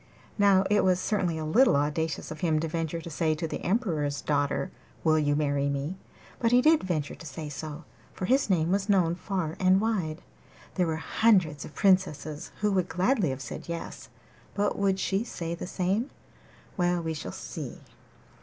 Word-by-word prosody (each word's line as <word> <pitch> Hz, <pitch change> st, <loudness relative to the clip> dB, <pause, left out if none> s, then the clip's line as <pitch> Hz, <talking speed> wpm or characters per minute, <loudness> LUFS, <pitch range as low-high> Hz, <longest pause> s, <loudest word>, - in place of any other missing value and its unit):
Now 200 Hz, -2 st, +5 dB
it 210 Hz, 0 st, +3 dB
was 185 Hz, -1 st, +3 dB
certainly 185 Hz, -5 st, 0 dB
a 155 Hz, -, -3 dB
little 230 Hz, -, +5 dB
audacious 150 Hz, +3 st, -1 dB
of 155 Hz, -, -7 dB
him 160 Hz, -2 st, +2 dB
to 165 Hz, -, -1 dB
venture 165 Hz, +1 st, -3 dB
to 170 Hz, -, -8 dB
say 155 Hz, 0 st, +1 dB
to 165 Hz, +1 st, -3 dB
the -, -, -5 dB
Emperor's 165 Hz, -, 0 dB
daughter, 145 Hz, +4 st, 0 dB, 0.3 s
'Will 155 Hz, -1 st, +4 dB
you 145 Hz, -1 st, +2 dB
marry 140 Hz, -1 st, +1 dB
me?' 140 Hz, +7 st, -3 dB, 0.4 s
But 230 Hz, -1 st, +2 dB
he 245 Hz, -, +6 dB
did 310 Hz, +4 st, +5 dB
venture 155 Hz, -6 st, -2 dB
to -, -, -11 dB
say 150 Hz, +2 st, -6 dB
so, 150 Hz, +2 st, -6 dB, 0.3 s
for 185 Hz, -, -4 dB
his 265 Hz, +2 st, +2 dB
name 170 Hz, -2 st, +2 dB
was 195 Hz, +1 st, 0 dB
known 180 Hz, -4 st, +3 dB
far 180 Hz, -3 st, -3 dB
and 185 Hz, 0 st, +5 dB
wide. 190 Hz, -8 st, -1 dB, 0.5 s
There 180 Hz, -2 st, +1 dB
were 160 Hz, -, 0 dB
hundreds 165 Hz, -3 st, +2 dB
of -, -, -12 dB
princesses 155 Hz, -6 st, +1 dB
who 210 Hz, 0 st, +2 dB
would 185 Hz, -2 st, +1 dB
gladly 185 Hz, -, +2 dB
have 130 Hz, 0 st, -4 dB
said 115 Hz, -, -8 dB
'Yes,' 170 Hz, 0 st, -6 dB, 0.5 s
but 205 Hz, 0 st, +1 dB
would 195 Hz, -1 st, +1 dB
she 195 Hz, +2 st, 0 dB
say 170 Hz, -8 st, -5 dB
the 170 Hz, -, -6 dB
same? 195 Hz, +9 st, -1 dB, 0.7 s
Well, 175 Hz, -1 st, +2 dB
we 160 Hz, 0 st, -2 dB
shall 120 Hz, -12 st, -6 dB
see. -, -, -7 dB
170 Hz, 185 wpm, -28 LUFS, 155-195 Hz, 0.7 s, he